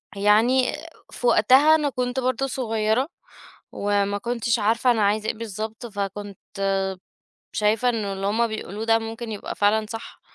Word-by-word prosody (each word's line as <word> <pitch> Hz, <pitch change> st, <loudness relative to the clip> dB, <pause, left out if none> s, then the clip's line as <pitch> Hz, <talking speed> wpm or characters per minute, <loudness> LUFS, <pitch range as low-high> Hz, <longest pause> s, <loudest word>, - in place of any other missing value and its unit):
يعني 225 Hz, +6 st, +3 dB, 0.4 s
في 245 Hz, -, -2 dB
وقتها، 265 Hz, +9 st, +6 dB
أنا 300 Hz, -2 st, +1 dB
كُنت 250 Hz, 0 st, -2 dB
برضه 255 Hz, +1 st, 0 dB
صغيرة، 225 Hz, 0 st, 0 dB, 0.6 s
وما 205 Hz, 0 st, 0 dB
كُنتِش 235 Hz, 0 st, -1 dB
عارفة 230 Hz, +4 st, +2 dB
أنا 225 Hz, -2 st, +1 dB
عايزة 210 Hz, +2 st, +1 dB
إيه -, -, 0 dB
بالضبط، 220 Hz, +1 st, -6 dB
فكُنت 205 Hz, -2 st, -5 dB, 1.2 s
شايِفة 215 Hz, +3 st, +2 dB
إن 245 Hz, -, +1 dB
اللي 195 Hz, -1 st, -3 dB
هُم 225 Hz, +3 st, +2 dB
بيقولوه 215 Hz, -1 st, -5 dB
ده 225 Hz, 0 st, +4 dB
ممكن 225 Hz, 0 st, -6 dB
يبقى 210 Hz, -, -5 dB
فعلًا 215 Hz, +1 st, +2 dB
صح. 225 Hz, -1 st, -8 dB
220 Hz, 145 wpm, -24 LUFS, 205-245 Hz, 1.2 s, وقتها